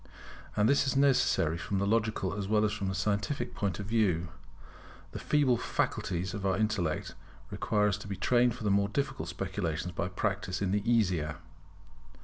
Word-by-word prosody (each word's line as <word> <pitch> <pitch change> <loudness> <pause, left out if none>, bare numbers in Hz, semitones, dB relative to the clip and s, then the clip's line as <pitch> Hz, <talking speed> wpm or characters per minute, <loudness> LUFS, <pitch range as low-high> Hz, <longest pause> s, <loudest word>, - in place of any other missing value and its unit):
And 105 +1 +3
this 140 +1 +3
is 130 - 0
necessary 125 - +3
from 100 - -2
the 100 - +1
logical 110 -3 0
as 100 -1 -3
well 105 +1 +3
as 105 - 0
from 100 -3 -3
the 95 - -2
scientific 105 - -1
point 100 -2 -2
of 100 - -4
view. 95 -6 +1 0.8
The - - -6
feeble 140 -5 +2
faculties 90 -4 -2
of 100 - -5
our 95 0 +1
intellect 100 -7 -1 0.4
require 105 -1 +1
to 100 +1 -4
be 100 - -3
trained 120 +4 +2
for 125 - -8
the 105 - +1
more 100 0 +2
difficult 105 - -2
speculations 90 -2 -3
by 85 - -2
practice 95 0 -2
in 95 -2 0
the 105 +1 +1
easier. 90 -9 +1
100 Hz, 175 wpm, -30 LUFS, 95-110 Hz, 0.8 s, And